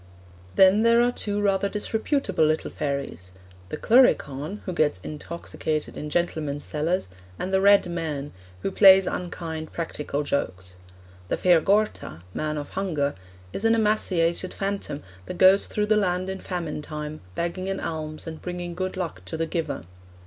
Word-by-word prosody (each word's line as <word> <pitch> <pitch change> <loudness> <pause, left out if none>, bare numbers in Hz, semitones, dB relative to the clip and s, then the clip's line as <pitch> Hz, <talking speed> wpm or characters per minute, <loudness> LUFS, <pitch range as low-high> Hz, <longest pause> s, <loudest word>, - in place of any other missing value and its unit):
Then 190 +2 +6
there 230 +1 +5
are 245 - +2
two 205 -4 -3
rather 200 0 +2
disreputable 220 - 0
little 155 0 +1
fairies 140 - -4 0.4
the - - -4
Cluricaun, 200 - +3
who 185 - -3
gets 150 - +1
intoxicated 155 0 -4
in 150 - -5
gentlemen's 150 -3 -1
cellars, 155 - -1 0.3
and 190 - -4
the 190 - +4
Red 200 -1 +6
Man, 155 -5 -4 0.3
who 195 - -1
plays 190 -1 +8
unkind 165 -3 -4
practical 150 -3 -3
jokes. 95 -10 -3 0.5
'The - - -1
Fear 175 -3 +5
Gorta 200 - 0
(Man 155 0 -2
of 145 -1 -5
Hunger) 155 -7 -1 0.4
is 195 - -3
an 225 0 +4
emaciated 185 -5 +1
phantom 195 -7 -3 0.2
that 180 - -6
goes 190 +2 +6
through 210 - -1
the 215 0 +3
land 185 -1 0
in 190 - -5
famine 170 -6 -4
time, 150 0 -6
begging 180 +3 -2
an 195 - -2
alms 155 -1 -5
and 160 -1 -7
bringing 175 -1 -5
good 185 +2 -3
luck 180 -3 -4
to 160 - -3
the 165 - 0
giver.' 160 - -3
175 Hz, 155 wpm, -25 LUFS, 150-195 Hz, 0.5 s, plays